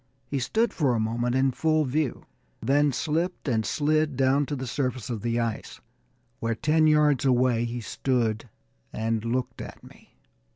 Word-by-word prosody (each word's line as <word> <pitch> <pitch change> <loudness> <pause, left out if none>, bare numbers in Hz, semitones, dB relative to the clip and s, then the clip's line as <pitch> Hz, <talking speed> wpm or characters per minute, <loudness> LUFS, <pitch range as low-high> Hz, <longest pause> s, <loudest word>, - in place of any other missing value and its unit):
He 140 +2 -2
stood 220 - 0
for 140 -8 +1
a - - 0
moment 120 +3 -1
in 135 0 +3
full 155 +3 +1
view 140 +1 -1 0.3
then 145 +1 +2
slipped 160 +6 -2
and 115 -4 +1
slid 155 +1 +1
down 135 +1 +2
to 145 - -2
the 130 -1 -4
surface 125 -2 -2
of 110 -3 -4
the 120 0 0
ice, 115 -2 -3 0.6
where, 115 -2 -1
ten 155 +5 +3
yards 150 -3 +4
away, 125 -3 +2
he 120 +1 -4
stood 115 -2 -1 0.4
and 110 0 -1
looked 125 +2 -2
at - - -10
me. - - -18
130 Hz, 165 wpm, -26 LUFS, 120-150 Hz, 0.6 s, yards